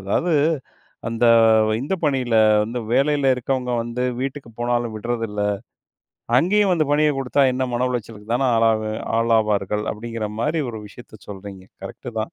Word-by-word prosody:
அதாவது 160 - 0 0.7
அந்த, 115 +1 -1 0.6
இந்த 145 +9 -2
பணியில 130 -5 0 0.3
வந்து 115 +3 -4
வேலையில 140 0 +3
இருக்கவங்க 125 0 -2
வந்து, 120 +1 -4 0.2
"வீட்டுக்கு 135 -2 -5
போனாலும் 120 -1 -1
விடுறதில்ல. 115 -1 -3 1.0
அங்கேயும் 195 +5 +3
வந்து 160 -3 +2
பணிய 150 +1 +3
குடுத்தா, 135 +1 +1
என்ன 130 +1 -1
மன 125 +1 +1
உளைச்சலுக்கு 115 -2 -5
தான 130 +1 +1
ஆளாவேன் 110 -1 +1 0.2
ஆளாவார்கள்" 105 -3 +1
அப்படீங்கிற 115 0 -5
மாரி 155 +5 0
ஒரு 110 -2 -7
விஷயத்தை 110 0 -14
சொல்றீங்க. 95 -1 -9 0.2
கரெக்ட்‌டு 120 +5 -8
தான். 110 - -5
120 Hz, 135 wpm, -21 LUFS, 110-135 Hz, 1.0 s, வேலையில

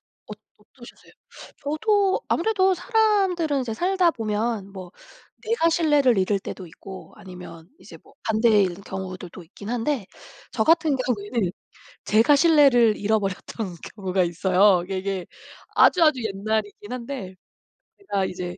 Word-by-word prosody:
어 - - -16 0.2
어떠셨어요? 240 +4 -17 0.5
저도 390 +7 +1
아무래도 380 0 +2
사람들은 385 - +1
이제 225 -3 -4
살다보면 230 - -1
뭐 185 -1 -10 0.5
내가 445 -7 +1
신뢰를 295 - +3
잃을 195 +1 +1
때도 185 -1 -8
있고 190 +3 -12
아니면 180 -4 -12
이제 - - -13
뭐 - - -22
반대일 210 -5 +2
경우들도 185 -2 -7
있긴 200 +5 -12
한데 245 -3 -2 0.5
저같은 320 -3 +2
경우에는 225 -5 -2 0.5
제가 225 +8 +4
신뢰를 280 -8 +5
잃어버렸던 200 -2 -3 0.2
경우가 190 -3 -1
있어요. 185 +2 +3
이게, 190 +1 -4
이게 190 -1 -4 0.5
아주아주 310 -8 +4
옛날이긴 210 +1 -3
한데 235 -6 -6 0.7
제가 200 - -2
이제 180 -1 -6
220 Hz, 295 characters per minute, -23 LUFS, 190-295 Hz, 0.7 s, 신뢰를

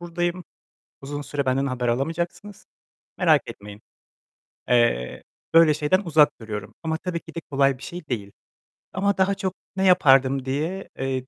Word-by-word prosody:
buradayım. 175 +1 -3 0.6
Uzun 145 +1 -5
süre 140 0 -3
benden 130 +1 +1
haber 125 -2 -2
alamayacaksınız. 165 +10 -3 0.5
Merak - - +4
etmeyin." 105 +1 -10 0.9
Eee, 120 - +1 0.3
böyle 165 -2 +7
şeyden 155 +5 +1
uzak 155 -3 +5
duruyorum. 105 -3 -6
Ama 160 -1 -1
tabii 170 0 -4
ki - - -15
de - - -2
kolay 135 -1 +2
bir - - -14
şey 175 -3 -8
değil. 105 -6 -4 0.6
Ama 200 +1 0
daha 190 +1 +2
çok, 190 -2 -3 0.2
"Ne 190 0 0
yapardım" 135 -6 +4
diye, 155 +9 -3
eee, 130 -1 -2
145 Hz, 150 wpm, -24 LUFS, 130-175 Hz, 0.9 s, böyle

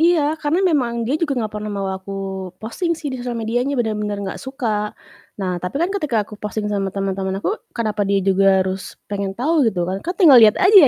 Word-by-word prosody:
Iya, 340 0 +5 0.2
karena 330 +5 +1
memang 245 -9 +1
dia 275 +7 -1
juga 295 -5 0
nggak 220 -3 -2
pernah 210 0 -4
mau 200 -1 -3
aku 190 +1 -7 0.4
posting 335 - -2
sih 295 -3 -5
di 260 - -5
sosial 245 -1 -3
medianya 245 +5 -1
bener-bener 210 -3 -1
nggak 190 - -5
suka. 225 -6 -2 0.4
Nah 185 -3 -2
tapi 180 +8 -4
kan 345 +6 0
ketika 275 - 0
aku 215 - -19
posting 210 0 -3
sama 195 -1 0
teman-teman 195 0 -2
aku, 420 - -1 0.2
kenapa 215 -3 -1
dia 200 - +3
juga 195 0 +4
harus 190 0 -5
pengen 200 -1 -3
tahu 290 0 +3
gitu 180 -5 -1
kan. 190 +2 -3
Kan 355 - -3
tinggal 295 - +8
liat 215 -2 +7
aja 390 +2 +5
220 Hz, 210 wpm, -20 LUFS, 195-280 Hz, 0.4 s, tinggal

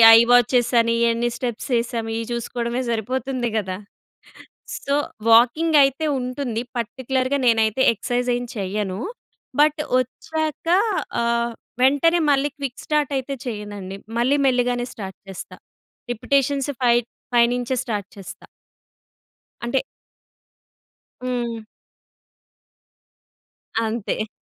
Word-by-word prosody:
I - - +9
watches 245 0 +4
అని, 230 0 +1 0.2
ఎన్ని 235 +1 0
steps 240 -1 -4
ఎసాము, 230 -1 -3
ఇవి 230 - -3
చూసుకోవడమే 235 +1 -2
సరిపోతుంది 250 +2 -1
కదా! 190 -3 -2 1.1
సో, 280 - +1 0.4
వాకింగ్ 255 +8 +5
అయితే 275 +3 +1 0.2
ఉంటుంది. 250 -2 -3 0.2
పర్టిక్యులర్‌గా 260 +3 -1
నేనైతే 225 +1 +3
ఎక్సర్సైజ్ 245 +3 -1
ఏం 245 - -3
చేయను. 195 0 -2 0.6
బట్ 300 +1 +4 0.2
వచ్చాక 310 +5 -4 0.5
ఆహ్, 235 0 +1 0.3
వెంటనే 285 +6 +4
మళ్ళీ 285 +1 +2
క్విక్ 275 -3 -5
స్టార్ట్ 300 -2 0
అయితే 265 +1 -4
చెయ్యనండి. 205 -4 -6 0.2
మళ్ళీ 260 +5 +3
మెల్లిగానే 245 -1 +1
స్టార్ట్ 190 -3 -7
చేస్తా. 190 -1 -8 0.6
రిపిటీషన్స్ 275 +3 +1
ఫై 240 -1 +5 0.4
ఫై 235 -1 +7
నుంచే 245 +1 -1
స్టార్ట్ 205 -4 -3
చేస్తా. 195 -2 -10 1.2
అంటే 240 +3 +1 1.4
హ్మ్. 235 -3 -3 2.2
అంతే. 220 -1 -2
245 Hz, 100 wpm, -22 LUFS, 225-265 Hz, 2.2 s, I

